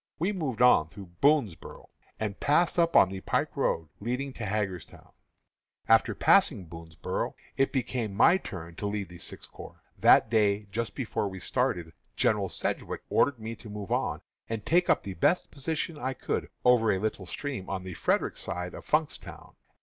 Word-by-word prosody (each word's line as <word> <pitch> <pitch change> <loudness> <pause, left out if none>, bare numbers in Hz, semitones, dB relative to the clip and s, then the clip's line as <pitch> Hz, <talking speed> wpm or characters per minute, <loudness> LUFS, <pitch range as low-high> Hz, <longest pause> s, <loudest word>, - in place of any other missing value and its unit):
We 180 +6 0
moved 140 - -1
on 80 -11 +5
through 95 0 -11
Boonsboro', 140 - +1 0.3
and 105 -2 -3
passed 170 +4 +2
up 170 0 +2
on 95 - +7
the 95 0 -6
pike - - -1
road 80 -1 0
leading 125 +5 -3
to 120 - -6
Hagerstown. 95 -4 -4 0.8
"After - - +4
passing 95 - +4
Boonsboro' 80 -1 -5 0.2
it 135 - +2
became 120 -6 -2
my 175 - +6
turn 85 - -8
to 105 - -3
lead 100 -3 -3
the 85 -1 -12
Sixth - - -5
Corps. - - -12 0.2
That - - +6
day, 105 -2 +2
just 115 0 -3
before 115 -5 -2
we 95 -1 -7
started, 85 -2 -1 0.2
General 100 -3 +1
Sedgwick - - -3
ordered 140 -3 +3
me 110 +1 -6
to 110 - -11
move 105 -2 -7
on - - 0 0.3
and 110 -2 -4
take 175 +2 +3
up - - +3
the 100 - -5
best 160 - +1
position 155 +2 -3
I 130 -1 -2
could - - -3 0.2
over 120 -3 +5
a 95 - +1
little 105 -2 -3
stream 130 -4 -5
on 95 -1 -3
the 95 0 -6
Frederick - - 0
side 90 +1 -4
of - - -9
Funkstown. 155 0 -2
105 Hz, 175 wpm, -28 LUFS, 95-135 Hz, 0.8 s, on